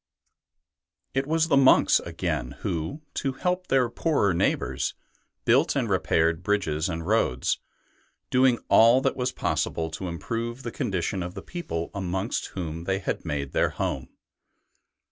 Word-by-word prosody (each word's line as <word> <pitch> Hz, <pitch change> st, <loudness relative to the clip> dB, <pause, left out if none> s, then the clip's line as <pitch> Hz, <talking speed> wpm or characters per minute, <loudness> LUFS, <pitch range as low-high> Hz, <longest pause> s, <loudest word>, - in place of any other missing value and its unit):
It 135 Hz, +1 st, 0 dB
was 160 Hz, +1 st, +2 dB
the 160 Hz, -, +3 dB
monks 135 Hz, -1 st, +6 dB
again 60 Hz, -, -3 dB
who, 90 Hz, -, -3 dB
to 135 Hz, -2 st, -1 dB
help 180 Hz, +6 st, -1 dB
their 130 Hz, -2 st, +3 dB
poorer 120 Hz, -, +1 dB
neighbours, 85 Hz, -, 0 dB, 0.5 s
built -, -, +4 dB
and -, -, +1 dB
repaired 80 Hz, +1 st, +2 dB
bridges 90 Hz, -5 st, 0 dB
and 80 Hz, -1 st, -4 dB
roads, 95 Hz, -, +1 dB, 0.7 s
doing 130 Hz, -1 st, +4 dB
all 115 Hz, +3 st, +6 dB
that -, -, +1 dB
was 125 Hz, 0 st, -1 dB
possible 80 Hz, -8 st, -1 dB
to 95 Hz, +3 st, -5 dB
improve 115 Hz, +8 st, -4 dB
the 120 Hz, -, -4 dB
condition 95 Hz, -, -2 dB
of 90 Hz, +1 st, -5 dB
the -, -, -7 dB
people 85 Hz, -, -4 dB
amongst 95 Hz, +2 st, -2 dB
whom 85 Hz, -2 st, -4 dB
they 95 Hz, +1 st, +1 dB
had 95 Hz, -, -3 dB
made 70 Hz, -3 st, -3 dB
their -, -, +2 dB
home. 65 Hz, -1 st, -3 dB
100 Hz, 145 wpm, -26 LUFS, 85-130 Hz, 0.7 s, monks